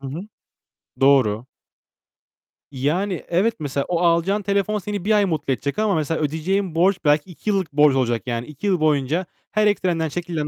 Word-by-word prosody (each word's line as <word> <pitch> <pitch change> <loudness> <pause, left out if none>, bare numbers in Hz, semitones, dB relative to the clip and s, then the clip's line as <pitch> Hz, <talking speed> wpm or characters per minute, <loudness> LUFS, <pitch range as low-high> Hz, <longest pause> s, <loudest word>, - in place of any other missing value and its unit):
Hı 135 - -7
hı. 155 +6 -5 0.8
Doğru. 130 -4 +3 1.3
Yani, 165 +8 -1
evet 195 +7 +2
mesela 140 -2 -2
o 175 -2 0
alacağın 175 +4 +2
telefon 200 +2 0
seni 205 -1 -5
1 220 - +1
ay 210 -1 +4
mutlu 150 -6 -1
edecek. 140 - -4
Ama 215 -4 +2
mesela 160 +1 -1
ödeyeceğin 165 +4 -1
borç 185 +3 +3
belki 150 +4 +2
2 210 - -6
yıllık 190 -7 0
borcun 145 -2 +4
olacak. 120 -3 0
Yani 120 0 -3
2 150 +7 -6
yıl 185 -3 +2
boyunca 155 +3 +1 0.3
her 215 0 +2
ekstrenden 175 -6 0
çekilen 165 -2 -3
165 Hz, 170 wpm, -22 LUFS, 145-195 Hz, 1.3 s, ay